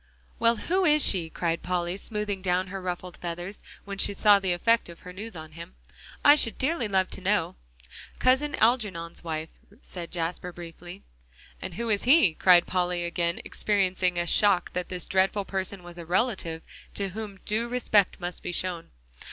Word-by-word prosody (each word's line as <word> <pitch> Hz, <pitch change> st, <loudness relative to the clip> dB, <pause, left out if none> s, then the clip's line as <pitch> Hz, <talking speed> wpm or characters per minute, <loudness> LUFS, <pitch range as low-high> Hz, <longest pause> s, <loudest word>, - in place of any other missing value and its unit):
"Well, 230 Hz, 0 st, +4 dB
who 370 Hz, -, 0 dB
is 300 Hz, -4 st, +5 dB
she?" 175 Hz, -4 st, +3 dB
cried 170 Hz, 0 st, -2 dB
Polly, 180 Hz, 0 st, -2 dB
smoothing 205 Hz, -1 st, -3 dB
down 185 Hz, 0 st, 0 dB
her 195 Hz, 0 st, -5 dB
ruffled 180 Hz, -1 st, -5 dB
feathers, 175 Hz, +3 st, -6 dB, 0.2 s
when 200 Hz, -1 st, -6 dB
she 200 Hz, -, +2 dB
saw 205 Hz, 0 st, +6 dB
the 190 Hz, -2 st, -1 dB
effect 230 Hz, +4 st, +2 dB
of 170 Hz, -, -12 dB
her 180 Hz, -, -10 dB
news 205 Hz, +2 st, -8 dB
on 155 Hz, -1 st, -9 dB
him. 165 Hz, +2 st, -11 dB, 0.5 s
"I 290 Hz, -, +10 dB
should 250 Hz, -6 st, +2 dB
dearly 265 Hz, -3 st, 0 dB
love 190 Hz, -2 st, +1 dB
to -, -, -4 dB
know." 200 Hz, +3 st, 0 dB, 0.6 s
"Cousin 280 Hz, +3 st, +2 dB
Algernon's 205 Hz, -9 st, 0 dB
wife," 160 Hz, -1 st, -4 dB, 0.3 s
said 175 Hz, -2 st, -8 dB
Jasper 175 Hz, +1 st, -3 dB
briefly. 175 Hz, +2 st, -11 dB, 0.6 s
"And 185 Hz, -2 st, -6 dB
who 235 Hz, +4 st, -3 dB
is 205 Hz, +1 st, 0 dB
he?" 260 Hz, -, +6 dB
cried 175 Hz, +1 st, +5 dB
Polly, 180 Hz, -1 st, -1 dB
again 170 Hz, 0 st, -2 dB
experiencing 185 Hz, -3 st, 0 dB
a 175 Hz, -, 0 dB
shock 195 Hz, +1 st, +3 dB
that 180 Hz, 0 st, -3 dB
this 180 Hz, -1 st, -5 dB
dreadful 195 Hz, +1 st, +1 dB
person 190 Hz, -1 st, -3 dB
was 175 Hz, 0 st, -11 dB
a 170 Hz, -, -8 dB
relative 180 Hz, -4 st, -1 dB, 0.3 s
to 200 Hz, -1 st, -1 dB
whom 205 Hz, 0 st, -7 dB
due 225 Hz, +3 st, -1 dB
respect 230 Hz, -5 st, +2 dB
must 175 Hz, 0 st, -5 dB
be 180 Hz, -, -4 dB
shown. 175 Hz, -1 st, -3 dB
185 Hz, 175 wpm, -27 LUFS, 175-210 Hz, 0.6 s, I